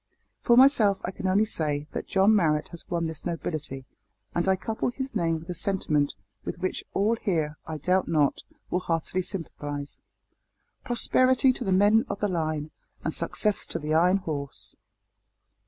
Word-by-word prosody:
"For 235 - +4
myself 230 -7 +6
I 180 - -3
can 190 - -4
only 200 +3 +3
say 150 -8 -1
that - - -5
John 195 +3 +4
Marrot 155 -6 +1
has 170 +2 -10
won 170 -2 -1
this 160 -1 -5
nobility, 155 -6 -4 0.5
and 175 +2 0
I 190 - +4
couple 220 +5 -2
his 265 +2 -5
name 165 -6 0
with 160 +1 -11
a - - -2
sentiment 155 - 0 0.3
with - - -5
which 185 +1 -3
all 215 +4 +2
here, 160 -8 -1
I 160 -1 -4
doubt 180 +5 +1
not, 150 -4 +1 0.3
will 180 - +1
heartily 175 +1 -1
sympathise. 145 -6 -4 0.8
Prosperity 255 +2 +3
to - - -3
the 190 - -1
men 205 +4 +4
of - - -4
the 205 - +1
line, 155 -3 -2 0.3
and 160 - -1
success 205 +4 +1
to - - -1
the 150 0 -3
Iron 180 +4 +4
Horse!" 150 -7 -5
175 Hz, 170 wpm, -26 LUFS, 155-200 Hz, 0.8 s, myself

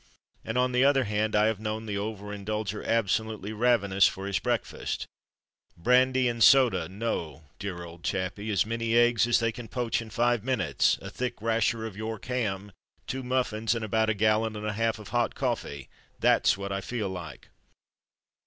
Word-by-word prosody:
And 110 +2 -3
on 125 0 +2
the 125 +1 +3
other 135 -1 +4
hand, 105 0 -1
I 105 0 +4
have 110 -2 0
known 110 +1 -4
the 100 -2 -3
over 105 -1 -5
indulger 105 0 -3
absolutely 110 -1 -1
ravenous 105 -4 +3
for 95 - -5
his 100 -1 0
breakfast. - - -2 0.7
"Brandy 130 +6 +3
and 115 -1 +1
soda, 120 - +5
no, 90 -8 -4 0.2
dear 95 -4 -5
old 85 0 -11
chappie; 100 +3 -2
as 105 -1 +2
many 115 +1 0
eggs 120 -2 +4
as 120 - +4
they 115 -1 +1
can 115 0 -9
poach 120 0 -1
in 115 - -9
five 120 0 +1
minutes, 125 -7 +1
a 100 - -7
thick 125 +2 -4
rasher 115 0 0
of 110 -4 -7
York 110 0 -5
ham, 105 -5 -2 0.3
two 130 - -4
muffins, 125 -3 0
and 115 -1 -3
about 110 +1 +1
a 110 - +1
gallon 110 +1 +2
and 105 0 -5
a 110 - -1
half 115 +1 0
of 105 -3 -11
hot 120 +2 0
coffee 115 - -3 0.3
that's - - +3
what 100 0 -5
I 100 0 -2
feel 110 -1 -3
like." 85 -6 -8
110 Hz, 180 wpm, -28 LUFS, 100-120 Hz, 0.7 s, soda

